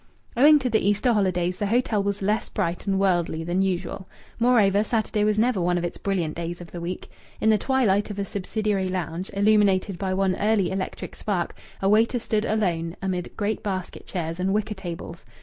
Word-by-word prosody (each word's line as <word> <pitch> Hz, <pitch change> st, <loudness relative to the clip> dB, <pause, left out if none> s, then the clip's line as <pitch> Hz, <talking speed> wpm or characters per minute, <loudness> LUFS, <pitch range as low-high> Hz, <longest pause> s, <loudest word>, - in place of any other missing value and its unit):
Owing 295 Hz, +5 st, +7 dB
to 265 Hz, -3 st, -1 dB
the 220 Hz, -3 st, +1 dB
Easter 205 Hz, +5 st, +2 dB
holidays 180 Hz, -3 st, +1 dB
the 205 Hz, -, -1 dB
hotel 225 Hz, -1 st, +1 dB
was 200 Hz, 0 st, -2 dB
less 210 Hz, +3 st, 0 dB
bright 180 Hz, -2 st, -2 dB
and 195 Hz, -1 st, +1 dB
worldly 175 Hz, -4 st, +1 dB
than 175 Hz, +3 st, 0 dB
usual. 190 Hz, 0 st, -2 dB, 0.3 s
Moreover, 215 Hz, -4 st, +4 dB
Saturday 215 Hz, -1 st, 0 dB
was 210 Hz, 0 st, +2 dB
never 225 Hz, -3 st, +2 dB
one 175 Hz, +1 st, +1 dB
of 175 Hz, -, -2 dB
its 175 Hz, -, -4 dB
brilliant 180 Hz, -6 st, -1 dB
days 170 Hz, +1 st, -4 dB
of 175 Hz, -1 st, -11 dB
the 175 Hz, -, -6 dB
week. 175 Hz, +2 st, -5 dB, 0.3 s
In 220 Hz, -, +4 dB
the 215 Hz, -, +3 dB
twilight 220 Hz, -7 st, +2 dB
of 205 Hz, -, -6 dB
a 200 Hz, -, -1 dB
subsidiary 200 Hz, 0 st, -1 dB
lounge, 180 Hz, 0 st, -3 dB
illuminated 200 Hz, -2 st, +3 dB
by 190 Hz, -1 st, -1 dB
one 190 Hz, -1 st, +1 dB
early 205 Hz, -3 st, +2 dB
electric 190 Hz, 0 st, -4 dB
spark, 190 Hz, -5 st, -2 dB, 0.3 s
a -, -, +3 dB
waiter 220 Hz, +4 st, +4 dB
stood 220 Hz, -2 st, -1 dB
alone 175 Hz, -6 st, 0 dB
amid 185 Hz, -2 st, -3 dB
great 210 Hz, 0 st, -1 dB
basket 185 Hz, -3 st, -5 dB
chairs 165 Hz, -2 st, -4 dB
and 190 Hz, +1 st, +1 dB
wicker 215 Hz, 0 st, -1 dB
tables. 170 Hz, -3 st, -7 dB
195 Hz, 195 wpm, -25 LUFS, 180-215 Hz, 0.3 s, Owing